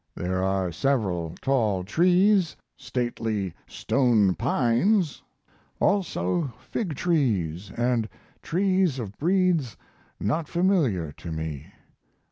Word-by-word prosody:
There 95 +1 -2
are 95 -2 0
several 90 - -1
tall 110 -9 +1
trees, 180 - +3 0.2
stately 115 -6 -3
stone 115 -8 +2
pines, 140 - +1 0.6
also 165 - 0
fig 160 - -4
trees 105 - 0 0.4
& - - -30
trees 185 -4 +1
of 105 -5 -6
breeds 170 - +1 0.4
not 150 +9 -1
familiar 150 - +1
to 85 +3 -9
me. 80 -3 -5
125 Hz, 95 wpm, -26 LUFS, -, 0.6 s, trees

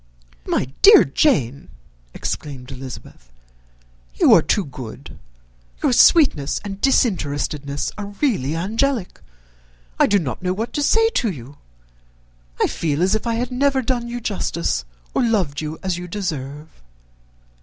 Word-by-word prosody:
"My - - +1 0.2
dear 425 +2 +9
Jane," 140 - 0 0.5
exclaimed 135 -4 -5
Elizabeth, 125 - -10 0.8
"you - - +5
are - - +7
too 205 - 0
good. 130 -5 -10 0.6
Your - - +3
sweetness 240 - +4
and 200 -1 -6
disinterestedness 145 - 0
are 205 0 -7
really 165 - 0
angelic; 220 - -1 0.8
I - - +5
do 205 - +3
not 155 -6 -3
know 180 0 -1
what 220 +5 -4
to 295 - -1
say 450 +10 +3
to 245 - 0
you. 140 -4 -9 1.0
I - - +4
feel 155 0 -1
as 190 - +2
if 220 +2 -1
I 230 - 0
had 245 +2 -2
never 270 +1 +1
done 240 -1 -1
you 240 +1 -5
justice, 170 - -2 0.3
or - - +1
loved 190 -12 0
you 155 +1 -5
as 185 -2 -2
you 180 - -7
deserve." 155 - -6
185 Hz, 140 wpm, -21 LUFS, 140-235 Hz, 1.0 s, dear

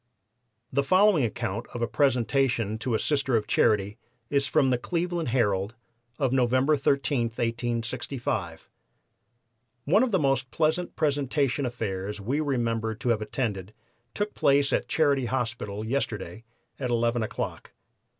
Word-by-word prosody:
The 140 - +3
following 185 +2 +4
account 110 0 -3
of 120 - -2
a - - +1
presentation 120 -3 +1
to 115 0 -1
a - - +1
Sister 140 -4 +1
of 110 -2 +1
Charity 105 -1 +1 0.3
is 140 -1 +3
from 135 -1 +3
the 125 - +1
Cleveland 170 +2 -2
Herald 105 -3 0 0.4
of 135 -2 0
November 130 +3 +3
13, 140 -2 +1
1865: 115 -5 -3 1.2
"One 190 +9 +4
of 260 - +2
the 195 - +2
most 135 -4 +1
pleasant 160 +6 0
presentation 140 -2 0
affairs 105 -3 -4
we 125 +9 -1
remember 115 -6 -1
to 120 +3 -3
have 110 -2 +2
attended 105 -3 -3 0.4
took 210 0 -2
place 140 0 +3
at - - 0
Charity 140 -5 +2
Hospital 115 -4 -3
yesterday, 115 -3 -3 0.3
at 130 -3 -2
11 120 0 +1
o'clock. 110 -6 -4
125 Hz, 135 wpm, -27 LUFS, 110-140 Hz, 1.2 s, following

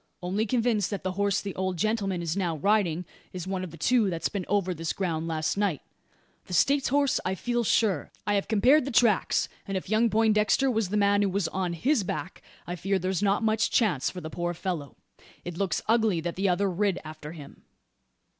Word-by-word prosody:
Only 200 +5 -1
convinced 230 -4 +1
that 200 - -4
the 185 - -1
horse 200 +1 0
the 200 -2 -5
old 185 -1 -2
gentleman 195 -2 -1
is 165 0 -2
now 175 -5 -1
riding 180 -1 +1 0.3
is 180 -2 -5
one 190 -1 -3
of 185 - -5
the 165 - -12
two 230 +4 +2
that's 165 -2 -2
been 200 -4 -4
over 195 -3 +1
this 165 -1 -3
ground 165 -4 -2
last 155 +2 -1
night 200 -8 0 0.6
the 180 - -3
States 275 - +3
horse 280 0 +2
I 185 - -1
feel 240 +5 -1
sure. 205 -6 +1
I 205 - +1
have 200 -1 0
compared 250 +7 +4
the - - -3
tracks; 230 -5 +3 0.2
and 195 -1 -1
if 185 - -6
young 225 +2 +3
Poindexter 220 +4 +3
was 220 -5 0
the 210 - 0
man 200 0 +3
who 200 - +2
was 190 -2 0
on 185 -2 -2
his 245 - +1
back, 165 0 -5 0.2
I 175 - -4
fear 195 +3 0
there's 185 +1 -1
not 205 +2 +2
much 220 0 +2
chance 180 - +2
for 180 - -8
the 155 -1 -7
poor 175 +1 -3
fellow. 165 -6 -4 0.5
It 175 -1 -5
looks 185 -1 -1
ugly 220 -5 +3
that 170 +1 -4
the 195 +1 +1
other 190 +3 +1
rid 190 0 0
after 155 0 -8
him." 145 -4 -12
195 Hz, 210 wpm, -27 LUFS, 175-215 Hz, 0.6 s, compared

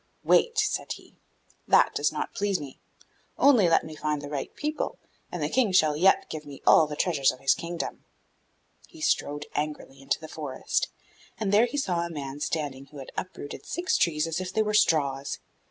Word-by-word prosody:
'Wait,' 465 -1 +3
he 430 - +4
said; - - -2 0.8
'that - - +5
does - - +1
not - - -4
please 200 -2 0
me; 140 -3 -9 0.6
only 245 -11 +5
let 165 - +3
me 155 -1 -8
find 150 -1 -1
the 145 0 -7
right 145 -2 -4
people, 305 +1 -3 0.3
and - - -3
the - - +1
King 245 -6 +2
shall 155 -5 +4
yet 185 +5 +4
give 155 -1 -6
me 145 -2 -10
all 155 - +7
the 150 - -5
treasures 145 -5 +2
of 130 - -11
his 135 0 +4
kingdom.' 170 0 -5 0.8
He 325 - -15
strode 145 - 0
angrily 150 -2 -4
into 135 - -1
the 160 - -9
forest, 150 -4 -2 0.5
and 210 -3 0
there 220 +4 +6
he 250 - -5
saw 185 -11 0
a 170 - -4
man 140 -3 -6
standing 145 -3 -3
who 145 +1 -13
had 135 - -9
uprooted 165 -6 -6
six 350 +1 0
trees 155 -2 +2
as 165 +2 -2
if 180 -1 -4
they 220 +2 +2
were 210 0 -2
straws. 140 -8 +2
155 Hz, 195 wpm, -27 LUFS, 145-195 Hz, 0.8 s, all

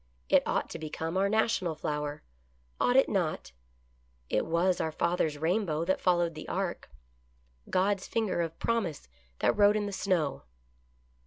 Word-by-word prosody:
It - - +6
ought - - 0
to - - -6
become 160 +2 -4
our 195 +1 +2
national 215 -6 +1
flower. 150 0 -3 0.6
Ought 245 - +3
it 265 - +6
not? 170 - -1 0.8
It - - +1
was 175 +2 +2
our 160 - -1
father's 160 -2 0
rainbow 165 0 0
that 190 - 0
followed 175 -2 +2
the 155 - -8
ark - - -3 0.4
— 60 0 -37
God's 190 +1 +1
finger 220 -6 0
of 165 -1 -4
promise 200 - -1 0.3
that - - +3
wrote 205 0 +5
in 210 - -1
the 205 - -4
snow. 180 -7 0
175 Hz, 155 wpm, -30 LUFS, 155-200 Hz, 0.8 s, It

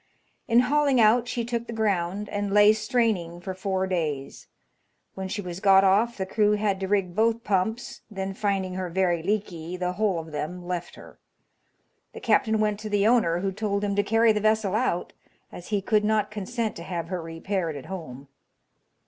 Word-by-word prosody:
In 235 +1 +5
hauling 280 0 +2
out 230 +2 +4
she 235 -1 -2
took 235 0 -3
the 235 - -5
ground, 205 -2 -1
and 205 -1 -2
lay 210 +1 +6
straining 210 -6 0
for 185 +2 -5
four 190 0 -1
days. 155 -7 -3 0.7
When 190 0 -5
she 205 +2 -4
was 175 0 -6
got 195 -1 +6
off 210 +5 +3
the 190 - -2
crew 210 +2 +2
had 205 -2 0
to 190 - -3
rig 195 -3 0
both 230 +2 +1
pumps, 210 +4 -1
then, 195 -2 -4
finding 195 -2 -1
her 185 -1 -3
very 175 -1 +1
leaky, 180 -3 -3
the 180 0 -1
whole 205 -2 0
of 160 -1 -6
them 165 +4 -5
left 175 -1 -4
her. - - -14 0.9
The - - -8
captain 220 -2 +2
went 210 -1 0
to 215 0 -6
the 205 -1 +2
owner, 205 -8 +3
who 195 0 -1
told 200 0 -2
him 200 -1 -1
to 205 - +3
carry 225 +2 +3
the 210 -1 0
vessel 215 -2 +2
out, 215 -6 -1 0.4
as 175 - -10
he 205 -3 -1
could 210 0 +2
not 215 0 +1
consent 215 +2 -3
to 170 - -7
have 170 -2 -4
her 185 -2 -3
repaired 165 0 -3
at 140 - -8
home. 140 -8 -8
200 Hz, 190 wpm, -26 LUFS, 180-215 Hz, 0.9 s, lay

